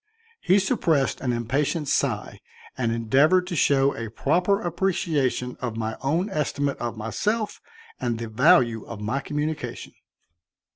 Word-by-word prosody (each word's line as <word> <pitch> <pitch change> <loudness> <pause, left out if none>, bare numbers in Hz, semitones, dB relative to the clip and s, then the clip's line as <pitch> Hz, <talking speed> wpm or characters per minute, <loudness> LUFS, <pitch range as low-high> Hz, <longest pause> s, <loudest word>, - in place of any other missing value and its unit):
He 190 - +4
suppressed 170 - +1
an 130 - 0
impatient 135 +6 -1
sigh - - -1 0.4
and 120 -3 -1
endeavored 135 +11 +3
to 180 -1 -4
show 140 -1 +3
a 115 -1 -5
proper 180 - +1
appreciation 170 - -1
of 120 -3 -3
my 110 0 -2
own 160 +8 0
estimate 145 -3 -1
of 120 -1 -4
myself 210 - -2 0.4
and 120 -2 -1
the 115 0 -5
value 115 -1 +4
of 115 - -8
my 110 +6 -1
communication. 150 +2 -4
140 Hz, 135 wpm, -25 LUFS, 120-170 Hz, 0.4 s, He